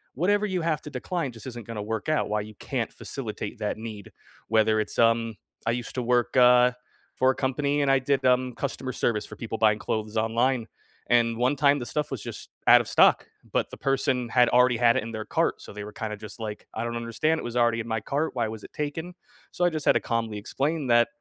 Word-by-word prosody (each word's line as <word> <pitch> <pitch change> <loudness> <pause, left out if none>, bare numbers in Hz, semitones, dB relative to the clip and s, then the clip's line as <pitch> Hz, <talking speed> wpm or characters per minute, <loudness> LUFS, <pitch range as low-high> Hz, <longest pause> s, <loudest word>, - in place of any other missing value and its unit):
whatever 205 +8 +2
you 185 -3 -1
have 160 -2 0
to 150 - -8
decline 165 -2 -3
just 115 +1 -11
isn't 120 -3 -7
gonna 115 -1 -5
work 110 0 -4
out, 155 - +1
why 105 0 0
you 105 +1 -9
can't - - -3
facilitate - - -6
that - - -2
need. 110 -2 -8 0.4
Whether 110 0 +3
it's, 105 - -3
um 115 -1 +3 0.3
I 115 - +2
used 120 0 -4
to 125 - -1
work, 120 0 +1
uh, 125 0 +6 0.4
for 130 0 +4
a - - -5
company, 140 +2 0
and 140 - +1
I 135 - +4
did, 135 0 0
um, 125 0 +3
customer 130 -1 -3
service 105 -3 0
for 105 - -10
people 110 +1 -5
buying 110 -1 +3
clothes 110 +1 -3
online. 115 +2 +1 0.4
And 115 -1 +3
one 125 +4 +2
time, 145 0 +3
the 120 - -5
stuff 150 +6 -2
was 130 -6 -4
just - - -8 0.2
out - - +9
of - - -8
stock, - - +4 0.2
but - - 0
the - - -8
person 135 -2 0
had 125 +1 +4
already 125 -1 +4
had 120 0 +4
it - - 0
in 115 - -6
their 110 -1 -5
cart, - - 0
so - - -10
they 105 0 -6
were 105 - -8
kinda 110 -2 -4
just 105 +2 -10
like, 105 -2 -6
"I 110 - -2
don't 120 0 -3
understand, 115 +8 0
it - - -6
was 120 0 -5
already 120 -1 +3
in 115 - -8
my 110 -1 -1
cart. 145 +7 -2
Why 120 -3 0
was 110 -1 -7
it - - -11
taken?" 160 +4 -4 0.4
So 175 - 0
I - - +5
just 155 -2 -4
had - - +6
to - - +2
calmly 115 -2 -2
explain 140 +7 -2
that, 120 -1 +5
120 Hz, 240 wpm, -26 LUFS, 110-135 Hz, 0.4 s, out